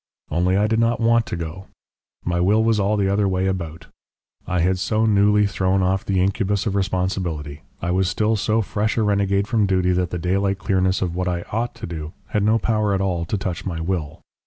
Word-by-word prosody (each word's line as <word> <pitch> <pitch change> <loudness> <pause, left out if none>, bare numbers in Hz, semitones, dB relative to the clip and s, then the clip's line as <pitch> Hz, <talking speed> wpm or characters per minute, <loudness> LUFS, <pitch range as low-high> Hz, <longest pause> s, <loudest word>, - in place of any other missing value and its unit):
"Only 90 +4 +2
I 105 - +3
did 110 +1 +1
not 115 0 +2
want 115 0 +3
to - - -3
go; 85 +3 -6 0.6
my 85 0 0
will 105 +5 +3
was 115 -1 +2
all 105 +2 +1
the 100 -1 +1
other 100 +1 +2
way 95 0 0
about. 85 -4 -3 0.6
I 90 -1 0
had 90 +2 +1
so 110 +3 +1
newly 105 0 +4
thrown 95 -1 +1
off 95 +1 +1
the 95 -2 0
incubus 100 +1 0
of 105 - -1
responsibility: 90 -6 -2 0.2
I 85 - 0
was 95 0 +1
still 105 +4 +1
so 110 +2 +1
fresh 105 +3 -1
a 110 - +3
renegade 100 -1 +1
from 110 -3 +2
duty 95 -1 +2
that 90 -1 0
the 90 - -3
daylight 95 +3 0
clearness 95 -1 +1
of 85 -2 -2
what 90 0 -1
I 85 -1 -1
OUGHT 115 +3 -2
to 115 -1 -7
do 80 -1 -6 0.2
had 105 - 0
no 110 +2 +3
power 105 -3 +1
at - - 0
all 90 -3 -1
to 105 - -2
touch 95 -3 -4
my 85 -4 -4
will. 80 -2 -3
95 Hz, 220 wpm, -22 LUFS, 90-105 Hz, 0.6 s, newly